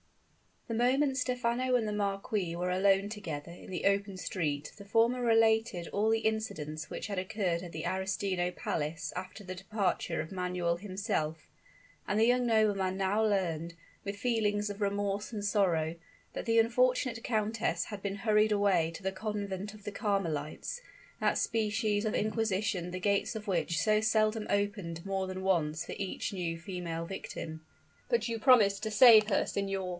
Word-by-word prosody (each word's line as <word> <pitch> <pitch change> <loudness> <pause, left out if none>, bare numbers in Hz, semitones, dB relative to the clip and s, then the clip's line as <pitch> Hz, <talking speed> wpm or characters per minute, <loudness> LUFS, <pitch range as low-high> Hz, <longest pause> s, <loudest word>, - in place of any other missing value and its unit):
The 230 - -3
moment 260 +4 +2
Stephano 250 0 0
and 230 -3 +1
the - - -1
marquis 195 -3 -1
were 180 +1 -1
alone 195 +2 +3
together 170 -7 -6
in 175 - -12
the 185 - -4
open 200 -1 +1
street 150 -6 -2
the 200 - -11
former 230 +4 +2
related 225 -5 +3
all 210 +2 +1
the 225 0 +3
incidents 160 -9 -2
which - - -5
had 200 -3 -2
occurred 185 -3 -1
at 175 -2 -8
the 160 -1 -5
Arestino 190 -1 -1
Palace 165 -8 -3
after 185 +3 -6
the 185 -1 -6
departure 185 -3 -1
of 160 - -8
Manuel 180 -2 -1
himself; 185 -5 -3 0.6
and 205 - 0
the 225 - +5
young 245 +1 +3
nobleman 205 -4 +2
now 195 +3 +1
learned, 170 -6 0 0.3
with 200 0 -4
feelings 210 -2 0
of 205 +1 -9
remorse 200 +1 -1
and 210 -2 -3
sorrow, 170 -6 +1 0.4
that - - -5
the 230 -1 +2
unfortunate 250 +1 +2
countess 215 -6 0
had 205 -2 -7
been 200 0 -3
hurried 215 +1 +3
away 190 -5 +2
to 185 - -9
the 190 - 0
convent 200 0 -4
of 210 - -15
the 205 - -4
Carmelites 195 - -2 0.4
that - - +2
species 215 -1 0
of 215 - 0
inquisition 210 -4 0
the 185 +1 -4
gates 200 +4 +1
of 215 -1 -5
which 170 -5 0
so 215 +6 +3
seldom 215 0 +2
opened 200 -5 -1
more 195 -1 -1
than 185 0 -5
once 160 -5 +1
for - - -6
each 195 -2 -3
new 170 -3 -2
female 170 -2 -4
victim. 160 -3 -6 0.5
"But 235 -1 +1
you 230 -1 -2
promised 215 -5 +5
to 220 - -2
save 220 -1 +8
her, 210 - +2
signor!" 195 -2 -2
200 Hz, 170 wpm, -31 LUFS, 180-220 Hz, 0.6 s, save